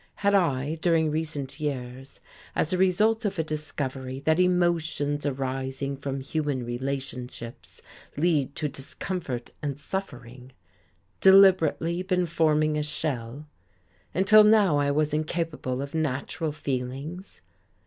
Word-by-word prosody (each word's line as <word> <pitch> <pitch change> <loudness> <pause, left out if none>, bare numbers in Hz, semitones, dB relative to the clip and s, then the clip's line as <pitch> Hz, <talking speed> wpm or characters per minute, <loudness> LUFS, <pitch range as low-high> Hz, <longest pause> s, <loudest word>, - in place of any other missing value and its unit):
Had 200 0 +1
I, 155 -5 +1
during 160 -2 +2
recent 150 -3 -4
years, 135 -3 -5 0.4
as 160 - 0
a - - +2
result 215 +5 +3
of 200 -2 -2
a 160 - +1
discovery 135 -4 -4
that 160 +4 +2
emotions 170 -5 +1
arising 135 0 -3
from 135 -1 -4
human 140 -3 -2
relationships 125 -1 -6 0.3
lead 145 -4 +1
to 155 - -1
discomfort 140 -1 -5
and 145 -1 -3
suffering, 130 -8 -6 0.7
deliberately 185 -3 +5
been 185 -1 +1
forming 155 -2 +2
a - - -1
shell, 145 -3 -4 0.7
until 205 +4 +6
now 210 -7 +5
I 145 0 +2
was 150 +1 +1
incapable 155 -4 -2
of 140 - -8
natural 155 +1 -2
feelings? 145 +5 -5
150 Hz, 120 wpm, -26 LUFS, 135-170 Hz, 0.7 s, until